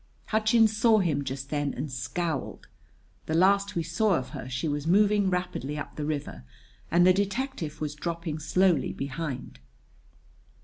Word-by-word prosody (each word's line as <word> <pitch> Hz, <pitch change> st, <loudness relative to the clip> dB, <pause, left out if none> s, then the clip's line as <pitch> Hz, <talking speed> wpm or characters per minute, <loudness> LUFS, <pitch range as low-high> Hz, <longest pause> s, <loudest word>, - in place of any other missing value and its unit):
Hutchins 220 Hz, 0 st, +3 dB
saw 225 Hz, 0 st, +5 dB
him 155 Hz, -8 st, +1 dB
just 135 Hz, 0 st, -5 dB
then 145 Hz, -1 st, -1 dB
and 150 Hz, -, -4 dB
scowled. 155 Hz, +7 st, -3 dB, 0.6 s
The 160 Hz, -, 0 dB
last 200 Hz, +3 st, +3 dB
we 170 Hz, -, 0 dB
saw 190 Hz, +4 st, +1 dB
of 130 Hz, -, -3 dB
her 125 Hz, -, -7 dB
she 130 Hz, +5 st, -2 dB
was 145 Hz, 0 st, -2 dB
moving 205 Hz, +2 st, +4 dB
rapidly 180 Hz, -6 st, -2 dB
up 150 Hz, -, -6 dB
the 150 Hz, -, -3 dB
river 145 Hz, -, -4 dB, 0.5 s
and 175 Hz, +1 st, +4 dB
the 185 Hz, -, +7 dB
detective 200 Hz, -, -2 dB
was 150 Hz, -1 st, -3 dB
dropping 165 Hz, 0 st, -4 dB
slowly 165 Hz, +1 st, +2 dB
behind. 135 Hz, -, -5 dB
165 Hz, 150 wpm, -27 LUFS, 145-200 Hz, 0.6 s, the